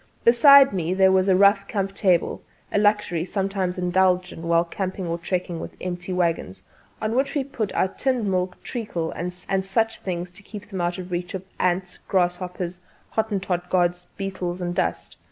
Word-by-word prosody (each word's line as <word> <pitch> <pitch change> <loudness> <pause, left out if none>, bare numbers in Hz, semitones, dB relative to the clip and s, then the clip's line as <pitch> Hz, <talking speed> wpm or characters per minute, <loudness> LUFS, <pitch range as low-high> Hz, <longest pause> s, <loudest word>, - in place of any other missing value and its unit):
Beside 275 +2 +8
me 180 -1 -1
there 190 0 +5
was 190 0 +3
a 190 - +5
rough 200 +1 +5
camp 195 -2 -2
table 185 -4 +1 0.3
a - - +2
luxury 205 -5 +2
sometimes 190 -1 -2
indulged 180 0 +2
in - - -9
while 170 0 +4
camping 185 +1 -4
or 170 0 -2
trekking 175 -1 -2
with - - -7
empty 175 0 -4
waggons 165 - -1 0.4
on 215 +1 -1
which 270 +5 0
we 285 - +1
put 245 -7 -3
our - - +3
tinned 250 +3 -1
milk, 185 -2 -1
treacle 195 -9 -3
and 180 +1 -4
such 195 +5 -1
things 175 -1 -4
to 190 - -8
keep 205 0 -10
them 190 -2 -3
out 175 0 -1
of 185 0 -7
reach 175 +1 -3
of 190 - -5
the 190 - -7
ants, 180 0 0
grasshoppers, 180 -1 -1 0.3
Hottentot 195 -5 -1
gods, 175 -1 +1
beetles 185 -2 -3
and 175 -1 -2
dust. - - -2
185 Hz, 180 wpm, -24 LUFS, 175-200 Hz, 0.4 s, Beside